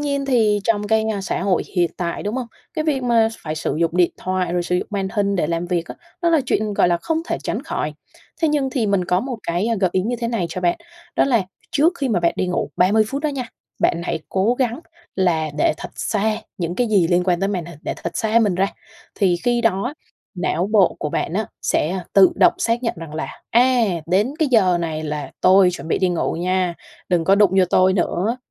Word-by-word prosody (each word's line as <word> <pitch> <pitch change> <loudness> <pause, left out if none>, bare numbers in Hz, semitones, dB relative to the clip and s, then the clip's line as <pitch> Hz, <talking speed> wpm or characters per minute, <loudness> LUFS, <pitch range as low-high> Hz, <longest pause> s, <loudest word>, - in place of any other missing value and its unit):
nhiên 280 -1 -1
thì 220 -6 +2
trong 210 -2 +1
cái, 220 0 +2
a, 200 - -3
xã 190 - -2
hội 190 -2 +1
hiện 175 -1 +3
tại, 170 -1 -3
đúng 205 +2 -3
hông? 255 -2 -3 0.3
Cái 310 - -1
việc 285 -4 0
mà 230 -2 +3
phải 155 -1 -3
sử 155 - -2
dụng 170 +1 +1
điện 180 -1 +4
thoại, 185 -2 -1
rồi 175 0 0
sử 180 +1 0
dụng - - -2
màn 195 -2 -2
hình 200 -1 0
để 170 - +1
làm 170 +2 -2
việc 175 -1 -1
á, - - -8 0.3
nó 340 - +3
là 325 -2 +4
chuyện, 215 -3 0
gọi 180 - +3
là, 175 - +2
không 320 - -2
thể - - -1
tránh - - -3
khỏi. - - -3 0.5
Thế 320 - +4
nhưng 290 -3 0
thì 250 -5 0
mình 200 -3 +1
có 180 +1 +1
một 255 +2 -4
cái 175 +6 -1
gợi 185 -3 +2
ý 190 - +2
như 240 +5 -2
thế 235 - -1
này 225 -7 -1
cho 175 +2 -5
bạn, 175 -1 +1 0.4
đó - - +4
là 240 -6 +2 0.3
trước 310 +5 +3
khi 275 - -1
mà 205 -7 +1
bạn 170 0 +2
đi 185 - 0
ngủ 180 - -2
30 205 +5 +4
phút 275 +4 -4
đó 305 - +1
nha, 270 -4 -4 0.3
bạn 170 - +1
hãy 160 - -2
cố 195 +6 +1
gắng 250 +1 -1 0.4
là 165 -5 +1
để - - +3
thật 180 - -7
xa 215 0 0 0.2
những 175 -1 -2
cái 245 +5 +1
gì 195 -6 +3
liên 175 +1 +2
quan 180 -2 +1
tới 195 - +1
màn 185 -4 -2
hình, 170 -3 -11
để - - -3
thật - - -4
xa 220 +1 +2
mình 210 -5 +2
ra. 190 +2 +2 0.5
Thì 185 -3 +2
khi 240 -1 +2
đó 225 +4 0 0.4
não 175 -1 -1
bộ 200 -4 +4
của - - -2
bạn 160 - -2
á 210 +3 -1 0.2
sẽ 175 +5 0
tự 195 -1 +7
động - - +5
xác 230 +1 0
nhận 230 - -1
rằng 165 -2 -8
là 155 - -3 0.2
"A! 250 +1 +4 0.2
Đến 200 - +1
cái 310 -3 +2
giờ 190 -8 +4
này 160 -2 -3
là 150 -3 -4
tôi 190 0 +6
chuẩn 170 - -7
bị - - +1
đi 185 - +2
ngủ 175 -2 -1
nha, 180 +1 0 0.3
đừng 175 -3 +1
có 195 - +5
đụng 205 -2 +4
vô 185 - +6
tôi 185 0 +4
nữa." 190 +4 0
195 Hz, 245 wpm, -21 LUFS, 175-230 Hz, 0.5 s, tự